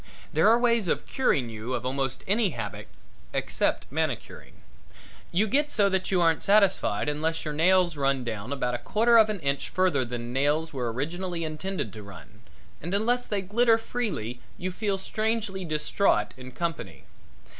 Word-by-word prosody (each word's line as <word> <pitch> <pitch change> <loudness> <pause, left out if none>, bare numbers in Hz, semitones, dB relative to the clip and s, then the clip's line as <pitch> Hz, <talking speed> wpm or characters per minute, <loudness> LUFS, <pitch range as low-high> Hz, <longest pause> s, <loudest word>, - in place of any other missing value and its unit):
There - - +5
are 230 - +6
ways 235 -4 +2
of - - 0
curing 135 - +1
you 110 +4 -4
of 125 - -4
almost 135 0 -2
any 210 +1 +2
habit - - -5 0.5
except - - 0
manicuring. - - -3 0.8
You 185 +5 +2
get 290 +6 +1
so 200 -2 +3
that 190 -1 -1
you 185 - +2
aren't 165 -2 +3
satisfied 195 - +3
unless 160 +3 -1
your 150 - -2
nails 175 +2 +3
run 135 -2 +1
down 110 0 -5
about 125 -3 -1
a 120 - -2
quarter 230 +2 +4
of 215 -1 +5
an 210 -2 -2
inch 140 -1 -1
further 180 -8 +2
than 120 0 -5
nails 150 +4 +1
were 125 -4 -2
originally 170 +7 -3
intended 155 - -4
to 110 - -8
run, 100 +2 -13 0.4
and 175 +5 -2
unless 245 +4 +1
they 200 -2 -1
glitter 225 +4 +3
freely 210 - -4 0.2
you 185 +1 -3
feel 200 +1 -1
strangely 215 -1 -2
distraught 155 - +1
in 130 0 -10
company. 170 +2 -4
170 Hz, 165 wpm, -27 LUFS, 130-205 Hz, 0.8 s, are